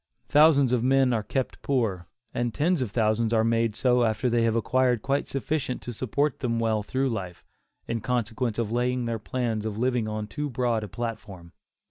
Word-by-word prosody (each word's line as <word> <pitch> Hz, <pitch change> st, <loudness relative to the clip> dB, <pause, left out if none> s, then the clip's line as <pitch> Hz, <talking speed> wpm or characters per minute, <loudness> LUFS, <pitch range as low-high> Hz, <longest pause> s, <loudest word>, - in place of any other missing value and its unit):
Thousands 145 Hz, -4 st, +5 dB
of 125 Hz, -2 st, +2 dB
men 135 Hz, -1 st, +3 dB
are 110 Hz, -, +1 dB
kept 130 Hz, +4 st, -3 dB
poor, 110 Hz, -10 st, -1 dB, 0.3 s
and 120 Hz, -1 st, -2 dB
tens 165 Hz, +1 st, +1 dB
of 125 Hz, -, -1 dB
thousands 110 Hz, +1 st, +1 dB
are 110 Hz, -1 st, +3 dB
made 115 Hz, -1 st, +1 dB
so 125 Hz, -1 st, +3 dB
after 115 Hz, +2 st, 0 dB
they 120 Hz, 0 st, +2 dB
have 115 Hz, -1 st, +1 dB
acquired 125 Hz, 0 st, +1 dB
quite 140 Hz, +1 st, 0 dB
sufficient 135 Hz, -1 st, -2 dB
to 120 Hz, -, -5 dB
support 135 Hz, +5 st, -1 dB
them 115 Hz, -3 st, -1 dB
well 110 Hz, -2 st, +1 dB
through 130 Hz, +5 st, -1 dB
life, 95 Hz, -6 st, -5 dB, 0.4 s
in 115 Hz, -1 st, -2 dB
consequence 120 Hz, 0 st, -1 dB
of 115 Hz, -2 st, -1 dB
laying 125 Hz, +1 st, 0 dB
their 115 Hz, -1 st, -2 dB
plans 115 Hz, -1 st, -2 dB
of 110 Hz, -1 st, -4 dB
living 125 Hz, -1 st, 0 dB
on 110 Hz, 0 st, -3 dB
too 145 Hz, +7 st, -4 dB
broad 120 Hz, -3 st, 0 dB
a -, -, -5 dB
platform. 105 Hz, -6 st, -6 dB
120 Hz, 190 wpm, -26 LUFS, 110-130 Hz, 0.4 s, Thousands